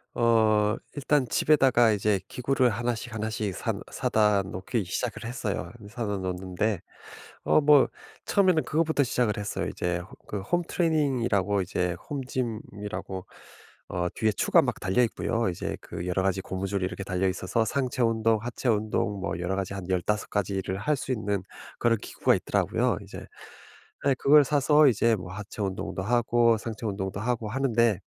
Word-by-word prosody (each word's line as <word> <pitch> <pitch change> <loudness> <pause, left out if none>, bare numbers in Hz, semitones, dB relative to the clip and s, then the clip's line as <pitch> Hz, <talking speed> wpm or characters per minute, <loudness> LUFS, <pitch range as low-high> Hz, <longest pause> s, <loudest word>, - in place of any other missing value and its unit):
어 110 -2 +3 0.2
일단 145 -2 +1
집에다가 130 -5 +4
이제 105 -1 +1
기구를 130 0 +1
1 120 +2 -1
씩, 115 +1 -8
1 110 0 -2
씩 105 -3 -2
사 - - -2 0.2
사다 105 -2 +2
놓기 95 +4 -3
시작을 115 +6 -3
했어요. 115 -3 -3
이 100 - -11
사다 110 -3 -3
놓는데 95 +1 -2 0.6
어 - - +4
뭐 145 -2 +6 0.4
처음에는 185 -6 +3
그거부터 160 -1 +1
시작을 125 -4 0
했어요. 105 0 -3
이제 90 0 -2
호 90 +1 -10
그 105 - -4
홈트레이닝이라고 135 - +1
이제 90 -1 -1
home 140 -3 -3
gym이라고 105 -6 -5 0.6
어 90 0 -1
뒤에 110 -1 +1
추가 - - +4
막 - - -2
달려있고요. 115 +2 +1
이제 85 - -4
그 85 - -6
여러 90 +1 0
가지 95 0 0
고무줄이 95 0 -3
이렇게 100 +1 -5
달려 95 0 0
있어서 95 +4 0
상체 130 -2 -2
운동, 115 -1 +2
하체 120 +2 -3
운동 105 -2 0
뭐 95 -2 -3
여러 90 +2 -1
가지 100 0 -3
한 95 -2 -6
15 95 +3 -1
가지를 95 -2 -2
할 150 +9 0
수 130 - -3
있는 105 -5 -1 0.4
그런 115 -1 +2
기구가 - - +1
있더라고요. - - 0
이제 - - -10 0.9
에 140 - +5
그걸 145 +3 +6
사서 150 +2 +4
이제 115 -1 +3
뭐 90 -2 -8
하체 105 +2 -8
운동도 95 -1 -3
하고 120 +1 +3
상체 115 +1 -5
운동도 95 -1 -3
하고 115 -1 -1
하는데 115 -4 +2
110 Hz, 340 characters per minute, -27 LUFS, 95-125 Hz, 0.9 s, 뭐